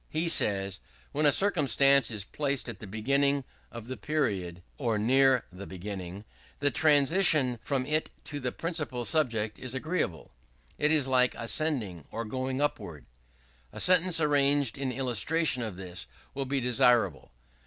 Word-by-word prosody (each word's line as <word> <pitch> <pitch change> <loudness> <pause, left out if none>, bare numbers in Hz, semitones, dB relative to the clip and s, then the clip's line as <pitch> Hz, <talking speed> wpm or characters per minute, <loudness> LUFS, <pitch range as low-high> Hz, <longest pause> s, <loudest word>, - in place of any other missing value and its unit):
He 165 +2 -1
says: 100 - 0 0.3
"When 150 +1 +2
a - - +6
circumstance 140 - +3
is 105 -4 -4
placed 140 +4 -2
at 115 -5 -7
the 105 - -9
beginning 140 +7 +1 0.3
of 115 -2 -9
the 130 +1 -6
period, 95 - -2 0.2
or 115 -6 0
near 130 +4 +3
the 95 +2 -9
beginning, 95 +1 -7 0.3
the 145 0 +1
transition 145 -3 +4
from 135 -3 -2
it 155 +3 0
to 145 - -6
the 125 -2 -3
principal 150 -8 -4
subject 115 -9 0
is 130 0 -6
agreeable: 130 - -3 0.5
it 150 - +2
is 150 -4 +3
like 125 -1 +3
ascending 115 - -2
or 115 +1 -5
going 130 +4 -3
upward." 100 - -3 0.7
A - - -9
sentence 180 -1 +3
arranged 145 -4 +2
in 135 -2 -3
illustration 130 +3 0
of 110 -5 -4
this 90 -1 -7 0.3
will 135 0 -3
be 135 +1 -1
desirable. 120 - +2
130 Hz, 150 wpm, -28 LUFS, 110-145 Hz, 0.7 s, a